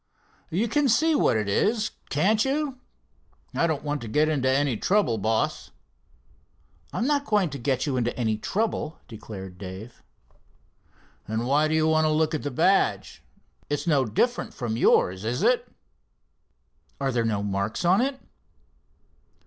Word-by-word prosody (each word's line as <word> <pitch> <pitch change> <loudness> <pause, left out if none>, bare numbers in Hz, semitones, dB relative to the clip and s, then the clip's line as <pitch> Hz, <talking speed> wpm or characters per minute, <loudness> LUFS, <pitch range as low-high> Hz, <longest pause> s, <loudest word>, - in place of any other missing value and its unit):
"You 200 +8 0
can 290 +3 +1
see 315 +8 +3
what 285 - +3
it 105 -2 -2
is, 215 - +1 0.2
can't 205 +9 +2
you? 275 -1 -2 0.7
I 170 - +2
don't 155 -4 -2
want 145 -1 -2
to 115 - -6
get 150 +7 +2
into 135 -2 +1
trouble, 180 - +1
boss." 110 +2 -1 1.2
"I'm 230 - -1
not 285 0 +1
going 205 - +1
to 140 - -6
get 130 +1 0
you 140 -4 -1
into 120 -1 -1
any 110 -3 0
trouble," 195 - -2
declared 100 -5 -9
Dave. 100 +5 -9 1.3
"Then 110 +2 -2
why 145 +4 +3
do 155 - 0
you 160 0 +2
want 160 0 +3
to - - +3
look 155 +1 +1
at 155 - -1
the 145 - -3
badge? 180 +9 +1 0.5
It's 145 - -2
no 145 -6 +3
different 185 - -1
from 115 -3 -3
yours, 95 -4 +3
is 120 +3 -2
it?" - - +2 1.3
"Are 135 -1 0
there 120 -2 0
no 105 -3 -1
marks 100 - -2
on 185 +5 +4
it?" 265 +1 -1
145 Hz, 155 wpm, -25 LUFS, -, 1.3 s, on